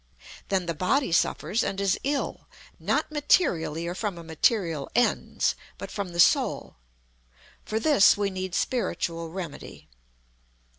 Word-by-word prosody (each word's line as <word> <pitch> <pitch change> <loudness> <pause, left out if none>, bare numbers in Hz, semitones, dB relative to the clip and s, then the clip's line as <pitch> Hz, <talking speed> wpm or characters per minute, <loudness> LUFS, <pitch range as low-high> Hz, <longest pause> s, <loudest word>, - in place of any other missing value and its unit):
Then 190 -2 +1
the 170 - -2
body 185 - +1
suffers 190 +6 +1
and 195 - -3
is 195 -1 +1
ill 280 +1 -2 0.3
not - - 0
materially 170 - +1
or 175 - -3
from 200 -1 -3
a 170 - -8
material 165 -1 0
Ens, 245 +1 +1 0.2
but - - -8
from 200 -3 -4
the 170 0 -7
Soul. 165 - +3 0.9
For 220 - -1
this 225 -8 +5
we 200 -1 0
need 185 -1 -4
spiritual 170 -9 -1
remedy. 170 -3 -8
185 Hz, 135 wpm, -26 LUFS, 170-220 Hz, 0.9 s, this